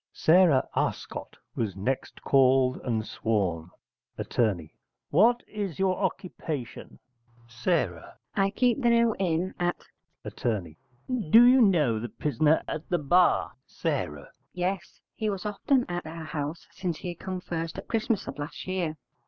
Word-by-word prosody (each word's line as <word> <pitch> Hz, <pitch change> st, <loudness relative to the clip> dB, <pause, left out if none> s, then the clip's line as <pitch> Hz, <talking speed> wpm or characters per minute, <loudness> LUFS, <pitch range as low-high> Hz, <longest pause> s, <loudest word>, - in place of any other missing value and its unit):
Sarah 165 Hz, -5 st, +4 dB
Arscott -, -, -3 dB, 0.2 s
was 105 Hz, -5 st, -2 dB
next 125 Hz, +8 st, -3 dB
called 130 Hz, -1 st, +4 dB
and 110 Hz, -4 st, -2 dB
sworn. 95 Hz, -9 st, -1 dB, 0.5 s
Att. -, -, -6 dB, 0.8 s
What 230 Hz, +10 st, +4 dB
is 205 Hz, -6 st, -4 dB
your 190 Hz, -1 st, +2 dB
occupation? 160 Hz, -, -4 dB, 0.5 s
S. 120 Hz, +1 st, -13 dB, 0.7 s
I 195 Hz, 0 st, +3 dB
keep 250 Hz, +5 st, +1 dB
the 240 Hz, -, +3 dB
New 235 Hz, -1 st, +4 dB
Inn 180 Hz, 0 st, 0 dB
at. 175 Hz, 0 st, -1 dB, 0.4 s
Att. -, -, -8 dB, 0.9 s
Do 230 Hz, +8 st, +9 dB
you 255 Hz, +1 st, +7 dB
know 155 Hz, -, +3 dB
the 120 Hz, +2 st, -5 dB
prisoner 150 Hz, +6 st, +1 dB
at 155 Hz, -, -5 dB
the 175 Hz, -, +2 dB
bar? 175 Hz, +4 st, +3 dB, 0.2 s
S. 75 Hz, -1 st, -3 dB, 0.3 s
Yes: 180 Hz, +1 st, -3 dB
he 215 Hz, -1 st, -2 dB
was 195 Hz, 0 st, -4 dB
often 245 Hz, +5 st, +1 dB
at 175 Hz, -2 st, -4 dB
our 160 Hz, 0 st, -7 dB
house 150 Hz, +1 st, -4 dB
since 175 Hz, -4 st, -3 dB
he 175 Hz, -, -5 dB
come 185 Hz, +2 st, -5 dB
first 165 Hz, -1 st, -4 dB
at 195 Hz, -, -7 dB
Christmas 225 Hz, -2 st, 0 dB
of -, -, -6 dB
last 145 Hz, +3 st, -6 dB
year. 180 Hz, -4 st, -2 dB
170 Hz, 140 wpm, -27 LUFS, 140-195 Hz, 0.9 s, Do